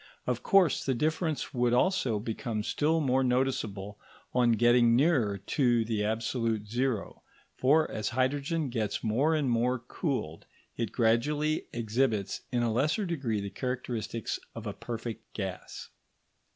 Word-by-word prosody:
Of 125 -2 -1
course, 190 -1 +4
the 130 - 0
difference 155 +3 -1
would 120 -1 +2
also 130 - +2
become 110 0 -3
still 160 +7 +1
more 135 -2 +2
noticeable 110 -6 -1 0.3
on 120 -2 +4
getting 120 0 +5
nearer 125 -8 +3
to 120 +3 +1
the 110 -2 -1
absolute 110 0 -1
zero; 120 -1 -2 0.4
for 155 +4 +4
as 110 -1 -2
hydrogen 140 +5 0
gets 110 -4 -2
more 130 +9 +2
and 150 -3 0
more 120 +1 +2
cooled, 120 - -4 0.3
it 115 -4 -2
gradually 145 +7 +1
exhibits 115 -2 0
in 120 -2 +1
a 115 -2 +1
lesser 150 - +1
degree 135 - -1
the 100 0 -5
characteristics 125 -3 -3 0.2
of 115 -1 -7
a 105 - -3
perfect 115 0 -6
gas. 95 -3 -6
120 Hz, 140 wpm, -29 LUFS, 110-135 Hz, 0.4 s, getting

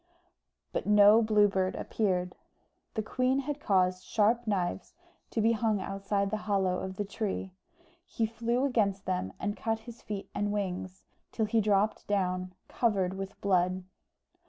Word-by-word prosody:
But - - -3
no 210 +2 +7
Blue 215 -2 +4
Bird 190 -1 0
appeared. 180 -4 -1 0.6
The 220 - -1
queen 255 +4 +1
had 290 +1 -4
caused 185 -5 +2
sharp 230 +2 +2
knives 190 - -2 0.3
to 225 - -1
be 225 +2 +4
hung 220 -2 +1
outside 195 +1 -2
the 215 - 0
hollow 190 -2 +2
of 190 0 -5
the 205 - -2
tree: 195 -2 -3 0.5
he 225 - -1
flew 235 +3 0
against 205 -7 +1
them 180 - -1
and 205 +1 -2
cut 225 -1 -2
his 235 +1 -11
feet 205 -2 -5
and 205 0 -1
wings, 185 -2 -3 0.3
till 220 - 0
he 220 +1 +2
dropped 210 0 +1
down, 185 -2 -1
covered 195 -6 +1
with 195 0 -6
blood. 185 -1 +1
205 Hz, 155 wpm, -30 LUFS, 190-220 Hz, 0.6 s, no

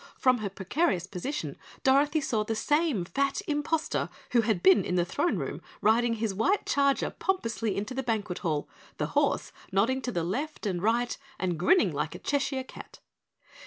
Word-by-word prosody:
From 255 -2 +3
her 210 -2 -2
precarious 190 - 0
position 200 +10 -4 0.3
Dorothy 290 +3 +4
saw 225 -6 0
the 225 +1 -2
same 295 - +1
fat 275 - 0
imposter 305 0 -1 0.2
who 240 - +5
had 215 -6 0
been 190 +1 +6
in 180 - -1
the 175 -1 +2
throne 265 - 0
room - - -4 0.2
riding 230 +2 +3
his 220 -2 -1
white 370 - +1
charger 280 -1 +2
pompously 230 - -1
into 210 +6 -3
the 265 - -1
Banquet 215 -7 -2
Hall, 155 -5 -1 0.3
the - - 0
horse - - +1 0.2
nodding 230 +8 +2
to 250 - -3
the 170 -6 -1
left 270 - -3
and 180 -4 -1
right 235 +4 +1 0.2
and 180 -4 -1
grinning 360 - +4
like - - -2
a - - -4
Cheshire 275 -2 -1
Cat. - - -12
230 Hz, 175 wpm, -28 LUFS, 195-280 Hz, 0.3 s, been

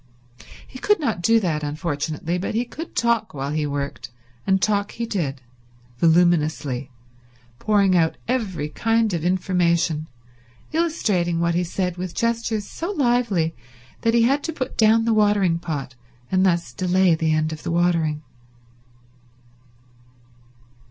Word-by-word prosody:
He 255 - -11
could 420 +5 +2
not 225 - -1
do 225 +5 +4
that, 160 -6 -1
unfortunately, 155 +2 -3
but 195 - -3
he 235 +2 +1
could 320 +7 -9
talk 235 -6 +1
while 140 +1 -3
he 150 -1 -1
worked, 140 -2 -4 0.4
and 190 0 +3
talk 205 0 0
he 235 - -3
did; 150 - -3 0.6
voluminously; 155 -6 +2 0.7
pouring 200 -3 +3
out 165 -2 +2
every 210 - -1
kind 225 +4 +1
of 165 -2 -2
information, 170 -3 +1 0.7
illustrating 210 - 0
what 170 0 +1
he 175 +1 +1
said 180 0 -2
with 180 -1 -5
gestures 230 -2 -1
so 335 - -5
lively 240 - +1 0.5
that 230 0 +2
he 235 - +5
had 275 +5 +2
to 325 - -2
put 275 -5 -5
down 225 +1 +4
the 230 - +2
watering 205 -5 +3
pot, 145 -6 -5 0.4
and 185 0 +3
thus 170 -8 +1
delay 185 +1 +3
the 160 0 +1
end 155 0 +1
of 155 - -8
the - - -5
watering. 165 -3 +1
180 Hz, 140 wpm, -22 LUFS, 160-225 Hz, 0.7 s, he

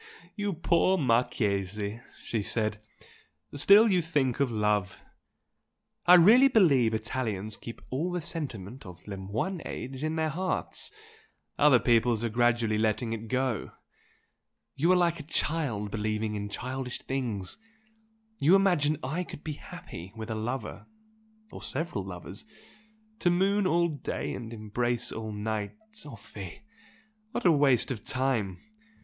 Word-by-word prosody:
"You 205 -2 -1
poor 170 +3 +2
Marchese!" 105 - 0 0.2
she 110 - -1
said 105 0 -1 0.7
"Still 200 +10 +7
you 185 -4 +3
think 145 -7 0
of 140 -3 +2
love! 105 -4 0 1.0
I 180 - +10
really 220 +10 +8
believe 140 - +4
Italians 110 -3 -3
keep 115 - -10
all 155 +8 -1
the 180 - -1
sentiment 130 - -5
of 90 -4 -12
le 100 - -4
moyen 110 - -3
age 130 +2 -6
in 155 +1 -1
their 160 -1 0
hearts, 185 +4 -2 0.7
other 145 -3 +7
peoples 115 -1 +3
are 115 - 0
gradually 120 -2 +2
letting 110 +1 0
it 115 0 -6
go. 130 -3 -1 1.0
You 165 +6 +3
are - - +6
like 170 -2 +2
a 155 +1 -11
child 125 -11 -1
believing 110 0 -1
in 105 -1 -4
childish 130 +3 -4
things! 115 -8 -3 0.8
You 165 +7 +6
imagine 175 -7 +3
I 155 +8 -2
could 150 - -10
be 155 - -3
happy 95 -8 -10
with 110 0 -6
a - - 0
lover 120 +5 -4 0.6
or - - -9
several 155 - -3
lovers! 95 +2 -8 0.8
To 175 - +3
moon 195 +3 +2
all 170 0 +3
day 150 -4 -4
and 115 -2 -6
embrace 115 +2 -2
all 110 -1 -5
night! 105 0 -3 0.3
Oh 140 - -8
fie! 100 - -10 0.7
What 240 - -3
a 175 - +7
waste 140 -5 +3
of 115 -4 -5
time! 120 -8 -1
125 Hz, 140 wpm, -29 LUFS, 105-160 Hz, 1.0 s, I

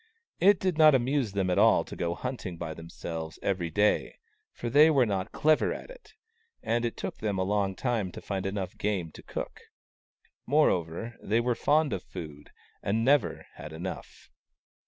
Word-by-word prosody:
It 195 +1 +5
did 185 -4 -1
not 155 -2 +8
amuse 130 -3 0
them 95 -2 0
at - - +2
all - - +5
to - - -8
go 85 0 -2
hunting 115 -7 -5
by 80 -1 -5
themselves 80 -1 -7
every 90 -4 -1
day, 105 +6 +1 0.4
for - - -6
they 145 +6 +6
were 135 -5 +4
not 95 -3 -2
clever 155 0 +3
at - - -7
it, - - -16 0.5
and 120 +1 0
it 115 - -3
took - - -5
them 105 -3 -1
a 95 - +1
long 100 0 0
time 110 -5 -1
to - - -7
find 95 -1 -3
enough 95 -2 -4
game 95 -6 -1
to - - -12
cook. - - -6 0.9
Moreover, 115 - +1
they 110 +3 +1
were 120 +1 +1
fond 145 +2 +2
of 95 - -3
food, 75 -5 -9 0.3
and 110 +3 0
never 140 +1 +2
had 75 - -8
enough. 90 +4 -8
105 Hz, 175 wpm, -28 LUFS, 90-130 Hz, 0.9 s, not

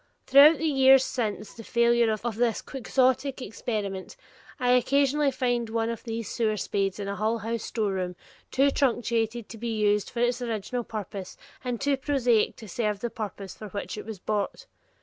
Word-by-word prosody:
Throughout 290 +4 +8
the 320 - -3
years 270 -3 +6
since 215 -5 -3
the 225 - -10
failure 235 0 +3
of 220 +1 -3
this 235 -1 0
Quixotic 260 +1 0
experiment, 205 -5 -4 0.4
I 250 -1 +2
occasionally 280 +3 +3
find 245 -3 -1
one 225 0 0
of 230 - -7
these 230 -1 -4
sewer 220 -3 0
spades 195 0 -1
in 200 - -4
a 200 - -3
Hull 220 +3 0
House 225 +1 -3
storeroom, 190 -5 -2 0.3
too 275 +1 +3
truncated 235 -4 0
to 225 - -10
be 230 -1 -3
used 210 -1 +2
for 235 - -4
its 245 +1 +1
original 235 +1 -3
purpose 205 -4 -6 0.3
and 245 -2 -2
too 280 -1 +1
prosaic 260 -5 +2
to 220 - -11
serve 210 0 -2
the 235 - -3
purpose 200 -3 -6
for 215 - -9
which 200 +1 -5
it 215 - -8
was 220 -2 -6
bought. 210 - -3
230 Hz, 175 wpm, -27 LUFS, 210-250 Hz, 0.4 s, Throughout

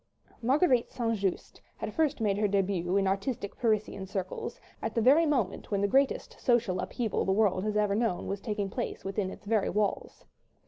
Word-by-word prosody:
Marguerite 260 0 +3
St. 230 -2 -1
Just 195 -3 -3 0.2
had - - -5
first 305 -4 +1
made 210 -3 +1
her 210 - +3
début 195 -2 +1
in 195 - +2
artistic 195 +2 -2
Parisian 215 -4 -1
circles, 190 -1 -4 0.2
at - - -3
the - - +3
very 290 +8 +5
moment 245 -10 -1
when 200 - 0
the 200 - +3
greatest 270 +5 +1
social 235 -7 +2
upheaval 225 +1 -1
the 190 - 0
world 195 -2 +2
has 210 0 0
ever 210 -1 +2
known 215 -4 0
was 200 0 -3
taking 205 -3 -2
place 240 -3 -4
within 195 0 -1
its 195 - -11
very 215 -1 +1
walls. 210 -1 -2
210 Hz, 185 wpm, -29 LUFS, 195-240 Hz, 0.2 s, very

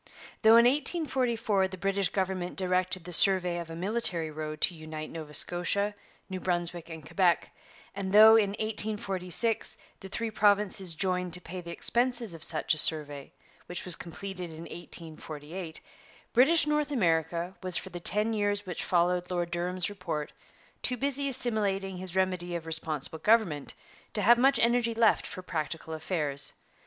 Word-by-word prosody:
Though 225 +1 +7
in 235 - +6
1844 250 - +1
the 185 0 -9
British 195 0 0
government 185 -2 -2
directed 185 -1 0
the 180 +1 -8
survey 180 -1 +5
of 170 -1 -7
a 165 - -7
military 180 -4 -1
road 155 0 -6
to - - +3
unite 155 -1 -8
Nova 155 -2 -8
Scotia, 200 +4 0 0.3
New 185 -1 -5
Brunswick, 175 -2 -3
and 160 -2 -9
Quebec, 175 +1 +1 0.4
and 195 -1 -4
though 215 +2 +9
in 205 -3 +2
1846 215 -1 0 0.2
the 195 - -10
three 230 +3 -3
provinces 205 -4 +2
joined 180 0 -1
to 180 - 0
pay 180 +1 -7
the 170 - -10
expenses 240 +2 +1
of 165 -1 -9
such 160 -1 +1
a 155 - -2
survey, 145 -3 +3 0.4
which 175 - -5
was 180 -2 +4
completed 180 +1 -7
in 160 0 -10
1848, 160 0 -7 0.5
British 290 +8 +5
North 300 0 0
America 170 - 0
was 185 -2 -1
for 190 - -6
the 175 - -6
ten 210 +6 +3
years 205 -1 -1
which 180 -3 -4
followed 180 0 +1
Lord 175 -1 -2
Durham's 180 +1 0
Report 175 -7 -5 0.5
too 250 - 0
busy 280 +1 -1
assimilating 205 -7 -2
his 185 0 -6
remedy 180 -2 -1
of 165 -1 -5
Responsible 160 -1 -2
Government 185 -8 +1 0.4
to 210 - -1
have 240 +2 +6
much 270 +2 +4
energy 235 0 +2
left 225 -1 +3
for 185 - -8
practical 160 -1 -4
affairs. 155 -3 -1
185 Hz, 160 wpm, -29 LUFS, 170-210 Hz, 0.5 s, though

